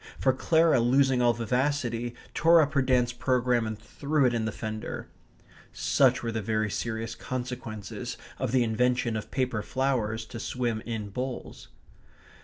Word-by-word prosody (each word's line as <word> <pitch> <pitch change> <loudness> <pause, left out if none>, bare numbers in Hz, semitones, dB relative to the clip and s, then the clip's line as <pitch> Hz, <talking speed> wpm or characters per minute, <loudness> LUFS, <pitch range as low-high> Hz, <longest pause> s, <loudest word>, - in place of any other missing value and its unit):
For 130 - +3
Clara, 160 +2 +3
losing 130 +1 +3
all 120 -1 +5
vivacity, 120 0 -1 0.2
tore 165 +1 +6
up 150 -2 +2
her 140 - +3
dance 125 -2 +2
programme 125 -2 +1
and 110 -1 -4
threw 140 +6 0
it 125 - +3
in 115 -2 0
the 110 - -1
fender. 110 0 -5 0.6
Such - - +3
were 115 - -1
the 110 0 -2
very 110 0 0
serious 115 +1 -3
consequences 120 -5 -5 0.2
of - - -1
the 130 -1 +4
invention 120 +1 +1
of 110 - -4
paper 125 -5 -1
flowers 120 -4 -1
to 115 - -8
swim 120 -2 -2
in 110 -3 -3
bowls. 125 +5 -5
120 Hz, 155 wpm, -28 LUFS, 110-130 Hz, 0.6 s, tore